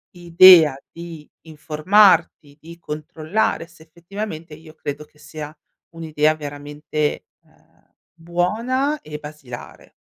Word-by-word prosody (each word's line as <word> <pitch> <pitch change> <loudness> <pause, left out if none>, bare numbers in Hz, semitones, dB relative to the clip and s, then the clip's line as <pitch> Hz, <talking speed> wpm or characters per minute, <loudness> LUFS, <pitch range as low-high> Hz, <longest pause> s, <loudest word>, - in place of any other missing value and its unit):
idea 170 -3 +7 0.2
di 165 -3 -11
informarti, 160 -1 +2
di 170 +2 -13
controllare 155 +4 -3
se 170 -2 -19
effettivamente 170 0 -8
io 160 0 -16
credo 150 -1 -7
che 150 - -29
sia 155 0 -9 0.4
un'idea 155 -2 0
veramente, 145 0 -4 0.2
ehm, - - -32 0.2
buona 220 - -2
e 150 0 -8
basilare. 150 -5 -11
160 Hz, 100 wpm, -20 LUFS, 150-175 Hz, 0.4 s, idea